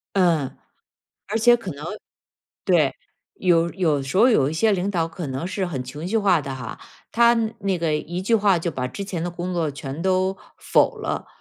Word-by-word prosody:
嗯， 170 -8 +3 0.8
而 215 +2 -1
且 240 +2 +5
可 200 -6 -6
能 145 +2 -9 0.8
对， - - +3 0.4
有 170 -2 +2
有 160 -7 +1
时 135 +6 -3
候 230 +5 +7
有 145 - +3
一 - - -4
些 215 +7 +3
领 195 0 0
导 170 -5 0
可 165 -1 -6
能 135 +4 -4
是 190 +2 -3
很 145 -8 -4
情 145 +6 -7
绪 220 +4 +1
化 190 -6 +3
的 135 -2 -5
哈， 125 -3 -7 0.3
他 235 +1 +5 0.2
那 195 -2 0
个 165 -2 0
一 170 +3 -4
句 195 +5 0
话 205 -4 +4
就 170 0 -2
把 125 -3 -3
之 200 - -6
前 175 -4 -4
的 175 - -2
工 175 +1 -4
作 165 -3 0
全 140 +2 -6
都 185 +1 +1 0.2
否 - - +2
了， - - -4
175 Hz, 215 characters per minute, -23 LUFS, 150-195 Hz, 0.8 s, 候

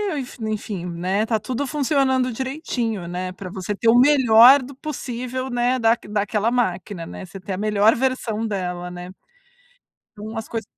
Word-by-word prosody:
enf 265 -4 -6
enfim, 215 -4 -4
né, 180 +4 -1
está 220 -1 0
tudo 255 +6 -3
funcionando 270 -3 +1
direitinho, 240 - -3
né, 180 +1 -4
pra 185 0 -8
você 190 +2 -4
ter 225 +3 +1
o 235 - +6
melhor 255 -1 +7
do 260 +2 -10
possível, 255 -3 -5
né, 245 +1 +1
da 225 0 +3
daquela 210 +2 0
máquina, 185 -6 -2
né. - - -8
Você 195 +2 -10
ter 190 +1 -5
a - - -3
melhor 210 +1 +3
versão 240 -4 -1
dela, 180 -3 -4
né. 175 0 -8 1.1
Então 215 +2 -7
as 220 - -5
coisas 225 -1 -4
225 Hz, 165 wpm, -22 LUFS, 195-255 Hz, 1.1 s, melhor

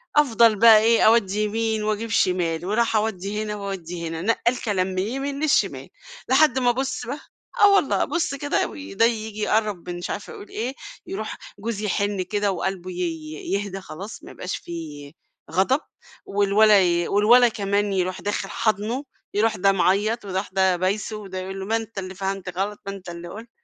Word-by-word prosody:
أفضل 235 -6 +5
بقى 225 -1 +9
إيه 225 +1 +4
أودّي 215 -2 +4
يمين 220 0 -1
وأجيب 215 +2 -1
شمال، 175 -4 +1
وأروح 225 +4 +1
أودّي 210 -1 -1
هنا 210 -1 -4
وأودّي 180 -4 -5
هنا، 165 0 -4
نقّال 235 +4 +1
كلام 190 -4 +1
من 185 -1 -3
اليمين 270 +7 -2
للشمال، 310 - +1 0.4
لحد 265 -1 +4
ما 245 -1 +3
بُصّ 260 0 -3
بقى، 275 +6 -5 0.4
آه 405 -1 +8
والله 320 -8 +2
أبُصّ 325 -2 -1
كده 290 +1 0
وده 100 - -1
ييجي 220 -2 -2
يقرّب 210 -4 0
مش 175 0 -5
عارفة - - -5
يقول - - -11
إيه، 240 +4 -3 0.3
يروح 215 +2 -5 0.2
جوزي 215 0 -3
يحِنّ 200 -1 0
كده 205 +2 0
وقلبه 185 -1 -3
ي 165 -3 -4 0.2
يهدى 200 -1 -2
خلاص 190 +4 -9
ما - - -10
يبقاش 185 - -5
في 150 -4 -8 0.4
غضب، 195 - +2 0.5
والولد 205 +2 +3
ي 175 -1 +2
والولد 235 +4 +5
كمان 200 0 0
يروح 185 -1 -1
داخل 205 0 -2
حاضنُه، 220 +5 -1 0.3
يروح 215 +1 +2
ده 195 +2 +4
معيّط 205 +4 +1
ويروح 190 +1 -2
ده 190 -1 +2
بايسُه، 195 +4 -1
وده 195 -3 -8
يقول 190 +1 -6
له 190 - -5
ما 220 +3 0
أنت 225 -1 -4
اللي 190 0 -7
فهمت 190 -1 -4
غلط، 205 +2 -2
ما 195 - -3
أنت 190 -2 -10
اللي 170 0 -7
قُلت، 220 +6 -9
205 Hz, 175 wpm, -23 LUFS, 185-225 Hz, 0.5 s, بقى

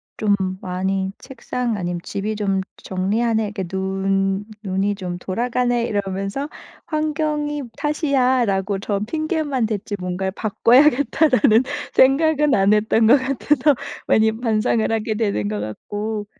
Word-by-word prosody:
좀 210 -2 +1 0.3
많이 190 +1 -2
책상 250 -3 -4
아니면 175 -2 -3
집이 210 +2 -3
좀 195 -2 0 0.2
'정리하네. 220 +4 0
이렇게 205 -2 -4
눈 195 +1 -1 0.2
눈이 195 +1 0
좀 180 -3 -5
돌아가네.' 240 +5 -1
이러면서 195 +5 -3 0.4
'환경이 300 -2 -1
탓이야.'라고 250 - +1
저 200 0 -2
핑계만 305 - -1
댔지 210 -1 -3
뭔가를 180 +1 -2
'바꿔야겠다.'라는 255 +3 +3 0.3
생각은 300 +2 +4
안 195 +1 +4
했던 220 +1 +3
것 255 +5 +7
같아서 275 +2 +1 0.3
많이 220 0 +4
반성을 220 0 0
하게 220 0 -1
되는 205 - -1
것 105 0 -3
같고 205 - -4
215 Hz, 280 characters per minute, -21 LUFS, 195-260 Hz, 0.4 s, 것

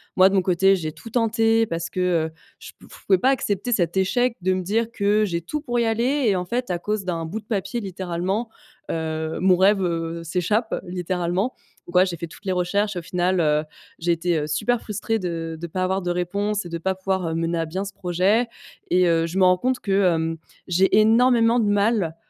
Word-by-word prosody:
Moi 190 +1 +6
de 195 - -1
mon 190 - +4
côté 190 +2 +4
j'ai 160 -4 -4
tout 230 - -12
tenté 225 -1 +2
parce 165 -4 -4
que, 185 - -5 0.3
heu, - - -20 0.3
je - - -10
pf - - -16
je - - -28
pouvais 190 - +5
pas 255 - +2
accepter 235 -2 -1
cet 175 -4 +1
échec 240 +6 +1
de 185 +1 +2
me 185 - -1
dire 220 +5 -1
que 210 0 +2
j'ai 170 -4 -2
tout 300 - -4
pour 240 -5 -1
y 235 - +2
aller 245 +5 +1
et 200 - +3
en 180 0 -2
fait 245 +4 -2
à 180 - 0
cause 210 +2 -2
d'un 165 -3 -2
bout 190 +7 -4
de 210 - -18
papier, 200 +1 -2
littéralement, 190 +3 -3 0.4
heu, 160 0 -3
mon 185 -1 +4
rêve, 195 +1 +4
heu, 165 -1 -2
s'échappe, 180 +7 -1
littéralement. 180 +4 -1 0.3
Donc 175 - -10
voilà, 185 - +6
j'ai 180 -2 -3
fait 170 - -5
toutes 170 - -16
les 190 - 0
recherches, 200 +3 0
au 175 - -3
final, 180 +2 0
heu, 150 -1 +2 0.4
j'ai 170 +1 +1
été, 170 0 0
heu, 150 - -3
super 225 +11 0
frustrée 220 +1 -2
de 165 -3 -4
de 170 - -5
pas 185 +3 -2
avoir 190 +1 0
de 175 - -2
réponse 200 +4 -1
et - - -7
de 170 - -3
pas 190 +3 -1
pouvoir, 190 -2 -2
heu, - - -3
mener 165 +1 -1
à 165 - 0
bien 185 +5 -4
ce 195 - -6
projet 190 +6 +1 0.4
et, 180 0 +4
heu, 165 0 +2
je 175 +3 -5
me 190 - +4
rends 180 0 +5
compte 255 +6 -1
que, 200 - -4 0.2
hem, 165 0 -2 0.3
j'ai 185 +2 +3
énormément 230 +1 +4
de 215 - +1
mal 205 -5 +1
185 Hz, 230 wpm, -23 LUFS, 170-215 Hz, 0.4 s, Moi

